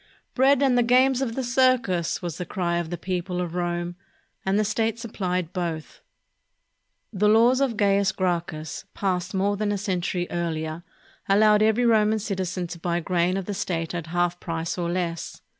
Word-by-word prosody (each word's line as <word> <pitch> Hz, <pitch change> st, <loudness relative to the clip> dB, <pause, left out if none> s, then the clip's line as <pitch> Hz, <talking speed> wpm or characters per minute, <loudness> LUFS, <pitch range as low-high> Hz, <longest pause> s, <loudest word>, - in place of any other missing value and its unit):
"Bread 275 Hz, +1 st, +4 dB
and 265 Hz, -2 st, +3 dB
the -, -, +5 dB
games 255 Hz, +2 st, +4 dB
of 235 Hz, -4 st, -2 dB
the 265 Hz, -, -2 dB
circus!" 240 Hz, -9 st, +1 dB
was 170 Hz, -1 st, -4 dB
the -, -, -1 dB
cry 175 Hz, -3 st, -1 dB
of 170 Hz, -2 st, -3 dB
the 175 Hz, -, -4 dB
people 180 Hz, 0 st, -3 dB
of 175 Hz, -2 st, -3 dB
Rome, 175 Hz, 0 st, -2 dB, 0.5 s
and 190 Hz, +1 st, +1 dB
the 215 Hz, -, +2 dB
state 220 Hz, +1 st, 0 dB
supplied 185 Hz, -7 st, -3 dB
both. 170 Hz, -4 st, -4 dB, 1.1 s
The 210 Hz, +1 st, +2 dB
laws 235 Hz, +5 st, +5 dB
of 250 Hz, -6 st, 0 dB
Caius 200 Hz, -1 st, +3 dB
Gracchus, 170 Hz, -4 st, -3 dB
passed 185 Hz, -1 st, -1 dB
more 200 Hz, +2 st, +1 dB
than 210 Hz, 0 st, 0 dB
a 205 Hz, -, 0 dB
century 180 Hz, -3 st, -1 dB
earlier, 160 Hz, -1 st, -3 dB, 0.5 s
allowed 210 Hz, +1 st, +5 dB
every 220 Hz, +3 st, +3 dB
Roman 220 Hz, -1 st, +4 dB
citizen 185 Hz, -4 st, -3 dB
to 170 Hz, 0 st, -7 dB
buy 170 Hz, 0 st, -1 dB
grain 175 Hz, +2 st, 0 dB
of 195 Hz, -, -3 dB
the 205 Hz, -, -3 dB
state 175 Hz, -4 st, -3 dB
at 170 Hz, -2 st, -4 dB
half 175 Hz, +1 st, 0 dB
price 165 Hz, 0 st, -3 dB
or 175 Hz, -2 st, -2 dB
less. 170 Hz, -2 st, -3 dB
185 Hz, 175 wpm, -25 LUFS, 175-215 Hz, 1.1 s, the